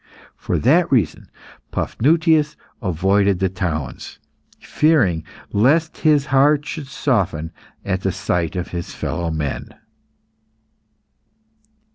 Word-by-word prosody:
For - - -2
that 160 +8 +3
reason, 115 - 0 0.4
Paphnutius 155 +2 +2 0.3
avoided 95 +1 +2
the 95 +1 0
towns, 85 -7 -4 0.4
fearing 115 - +2 0.3
lest 150 +10 +2
his 150 -3 +3
heart 145 +1 +3
should 150 -2 -6
soften 95 - -1 0.3
at 95 -1 -1
the 95 - 0
sight 85 -1 -2
of 90 -1 -3
his 85 -1 -6
fellow 85 0 -3
men. 75 -3 -4
100 Hz, 100 wpm, -20 LUFS, 90-150 Hz, 0.4 s, that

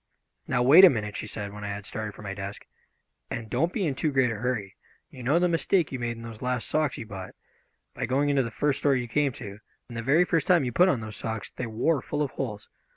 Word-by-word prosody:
"Now, 125 -1 +1
wait 150 +9 +8
a 190 - +11
minute," 105 -7 -3
she - - -4
said, 100 -2 -5
when 105 0 -8
I - - -3
had 100 0 -5
started 110 -2 -5
for - - -11
my 100 -1 -4
desk, 100 +1 -7 0.6
"and 115 -2 -5
don't 160 +8 +1
be 200 -3 -1
in 150 - 0
too 150 +3 -1
great 130 -3 +3
a - - -3
hurry. 110 -4 -2 0.4
You 130 - -10
know 140 +7 +2
the 180 +1 +3
mistake 170 0 +1
you 130 - -4
made 120 -1 -3
in 115 - -9
those 115 -2 -9
last 125 -1 -1
socks 155 -3 0
you - - -6
bought, 95 -3 -8 0.6
by 130 0 -3
going 140 +3 +1
into 140 -1 +3
the 115 - -2
first 145 +4 0
store 140 -2 +3
you 125 -2 -2
came 145 +3 +1
to, 105 -5 -8 0.3
and 120 - -10
the 115 - -3
very 145 +9 +4
first 165 -4 0
time 175 -5 +5
you 125 - -2
put 180 +9 +5
on 130 -9 +1
those 110 -2 -7
socks 110 -1 -4
they 125 - -5
wore 120 +6 +1
full 150 +3 -2
of 140 - -3
holes. 105 -6 -5
125 Hz, 265 wpm, -27 LUFS, 110-145 Hz, 0.6 s, a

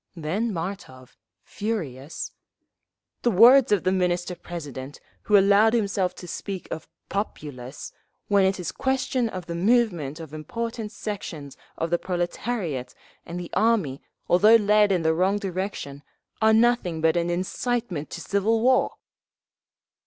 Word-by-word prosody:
Then 185 +8 -2
Martov, 165 -9 -6 0.3
furious: 165 - -4 0.9
"The 240 - +2
words 240 +5 +7
of 205 -4 +3
the 185 - +2
Minister 180 -1 0
President, 145 -6 -8 0.2
who 210 - +4
allowed 200 +3 +5
himself 200 -5 0
to 180 - -10
speak 195 +1 -5
of 160 - -5 0.2
'populace' 145 - -5 0.4
when 200 -1 +4
it 190 0 +1
is 175 - -3
question 265 -2 0
of 185 -4 -6
the 170 - -5
movement 175 - +1
of 160 -2 -9
important 225 +7 -5
sections 190 -10 -6 0.2
of 165 +1 -2
the 175 - +2
proletariat 175 - -3 0.3
and 170 +1 -5
the 175 - -7
army—although 210 - +2
led 210 -1 +4
in 180 -3 +1
the 160 0 +3
wrong 185 +5 +2
direction—are 190 -6 -4 0.6
nothing 220 -7 +3
but 160 0 +3
an 170 0 0
incitement 185 - -2
to 175 - -7
civil 205 +5 +1
war." 255 +3 +3
185 Hz, 130 wpm, -25 LUFS, 165-220 Hz, 0.9 s, words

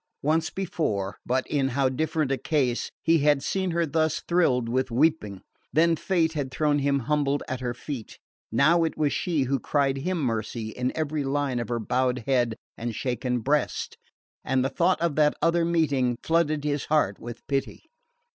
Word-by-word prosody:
Once 155 +2 +1
before 130 - -2
but 130 +1 +1
in 140 -3 0
how 135 -1 +3
different 155 +2 -1
a 135 - +1
case! 135 -6 0
he 165 0 +4
had 145 -1 +3
seen 190 -1 -1
her 170 0 +1
thus 160 +1 0
thrilled 135 -9 +2
with 130 +2 0
weeping. 120 - +1 0.3
Then 165 +2 +4
fate 165 -2 0
had 145 -4 -2
thrown 145 +1 +1
him 140 0 +1
humbled 145 +1 0
at 130 -3 -3
her 120 -1 -3
feet, 125 -3 -7 0.3
now 155 +9 +4
it 160 - -2
was 145 -2 +1
she 160 -6 0
who 135 +1 0
cried 135 +1 +1
him 175 +6 -2
mercy 115 -3 -2
in 125 +3 -2
every 155 -1 -1
line 135 -2 -1
of 120 - -4
her 120 - 0
bowed 125 +2 0
head 120 -4 +1 0.2
and 115 -1 -4
shaken 125 0 -2
breast; 145 +5 0 0.5
and 130 0 +1
the - - +1
thought 170 +4 +2
of 170 -4 0
that 150 -1 +4
other 170 0 +2
meeting 140 -8 +1
flooded 155 -3 +1
his 145 -1 -1
heart 150 -11 +1
with 120 0 -9
pity. 135 -1 -2
140 Hz, 180 wpm, -26 LUFS, 125-160 Hz, 0.5 s, he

